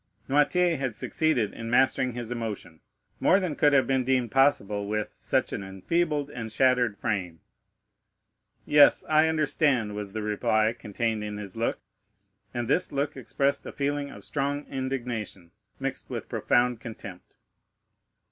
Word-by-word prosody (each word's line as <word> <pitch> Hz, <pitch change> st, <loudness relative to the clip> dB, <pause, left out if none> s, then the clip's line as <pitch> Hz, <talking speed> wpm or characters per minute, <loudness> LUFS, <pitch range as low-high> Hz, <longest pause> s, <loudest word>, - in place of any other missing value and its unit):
Noirtier 165 Hz, +5 st, +3 dB
had 130 Hz, -5 st, -2 dB
succeeded 140 Hz, -10 st, 0 dB
in 115 Hz, 0 st, -6 dB
mastering 130 Hz, 0 st, +2 dB
his 120 Hz, -1 st, -6 dB
emotion 110 Hz, -9 st, -5 dB, 0.4 s
more 190 Hz, -, +4 dB
than 180 Hz, -6 st, -2 dB
could 145 Hz, -, +4 dB
have 135 Hz, -2 st, +4 dB
been 130 Hz, -1 st, +1 dB
deemed 125 Hz, -3 st, +1 dB
possible 105 Hz, -7 st, +2 dB
with 105 Hz, 0 st, -2 dB
such -, -, -1 dB
an -, -, -3 dB
enfeebled 145 Hz, -, -1 dB
and 115 Hz, -4 st, -6 dB
shattered 125 Hz, -3 st, +2 dB
frame. 95 Hz, -8 st, -2 dB, 1.3 s
"Yes, 145 Hz, -1 st, +6 dB
I 155 Hz, +1 st, +4 dB
understand," 145 Hz, -8 st, +1 dB
was 105 Hz, -1 st, -6 dB
the 110 Hz, -, -3 dB
reply 110 Hz, +1 st, +1 dB
contained 110 Hz, -1 st, -2 dB
in 105 Hz, 0 st, -5 dB
his 100 Hz, -3 st, -8 dB
look; 115 Hz, +1 st, -1 dB, 0.7 s
and 120 Hz, -1 st, -3 dB
this 180 Hz, +8 st, +1 dB
look 140 Hz, +1 st, -1 dB
expressed 140 Hz, +2 st, -1 dB
a -, -, -5 dB
feeling 145 Hz, 0 st, -2 dB
of -, -, -12 dB
strong 145 Hz, 0 st, -2 dB
indignation, 120 Hz, -9 st, -4 dB, 0.3 s
mixed -, -, -4 dB
with -, -, -5 dB
profound 120 Hz, -1 st, +1 dB
contempt. 100 Hz, -5 st, -10 dB
125 Hz, 145 wpm, -27 LUFS, 105-140 Hz, 1.3 s, Yes